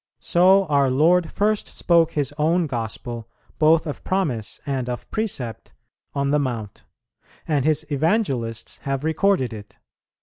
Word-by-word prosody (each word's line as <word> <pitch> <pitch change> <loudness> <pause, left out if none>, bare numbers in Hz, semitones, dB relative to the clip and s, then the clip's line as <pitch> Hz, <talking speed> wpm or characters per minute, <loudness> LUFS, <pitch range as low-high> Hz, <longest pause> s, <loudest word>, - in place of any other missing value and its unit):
So 190 +3 +4
our 140 -4 +2
Lord 165 +6 +3
first 210 +1 0
spoke 170 -2 +2
His 145 -2 -1
own 165 +3 +2
Gospel, 115 -2 -5 0.3
both 160 +1 +4
of 150 - -6
promise 150 - -2
and 130 -3 -2
of 125 - -5
precept, 165 - -4 0.4
on 140 0 0
the 150 - +3
Mount, 115 -7 -4 0.6
and 145 -4 +1
His 155 0 +1
Evangelists 140 - -1
have 135 0 -3
recorded 160 - +1
it. 105 -1 -11
145 Hz, 135 wpm, -23 LUFS, 125-170 Hz, 0.6 s, So